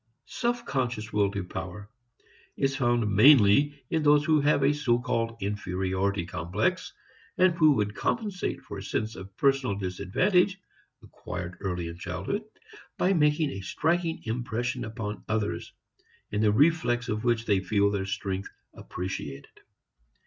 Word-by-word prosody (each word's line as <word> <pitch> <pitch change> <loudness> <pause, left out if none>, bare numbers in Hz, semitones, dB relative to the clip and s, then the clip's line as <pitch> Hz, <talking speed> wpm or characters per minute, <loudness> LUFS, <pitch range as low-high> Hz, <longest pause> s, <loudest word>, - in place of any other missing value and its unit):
Self 240 - -2
conscious 120 -4 -2
will 100 -1 +3
to 100 -1 -4
power 95 +2 -7 0.7
is 135 0 +1
found 120 -4 +1
mainly 140 +4 +5
in 160 - +1
those 150 0 +4
who 155 -2 +3
have 145 -1 +3
a 140 +2 +4
so 130 -5 +1
called 115 -2 -2
inferiority 95 -1 -1
complex, 95 - -2 0.5
and 185 -1 +5
who 155 -3 +5
would 105 -4 -1
compensate 205 - -2
for 100 - -7
a - - -8
sense 110 +2 -2
of 95 0 -11
personal 135 -6 +2
disadvantage 105 - +1 0.4
(acquired 90 +1 -7
early 90 -3 -3
in 85 +1 -8
childhood) 95 - -3 0.5
by 185 +2 +2
making 150 -2 +2
a 95 - -6
striking 165 - -1
impression 120 +2 -2
upon 110 -2 -5
others, 110 -1 -2 0.6
in 105 - 0
the 105 -1 +4
reflex 125 -1 +2
of 110 -2 -2
which 120 -2 +1
they 100 -3 +3
feel 100 +2 +2
their 95 -1 -2
strength 95 0 -3 0.2
appreciated. 90 -7 -6
110 Hz, 140 wpm, -27 LUFS, 100-145 Hz, 0.7 s, mainly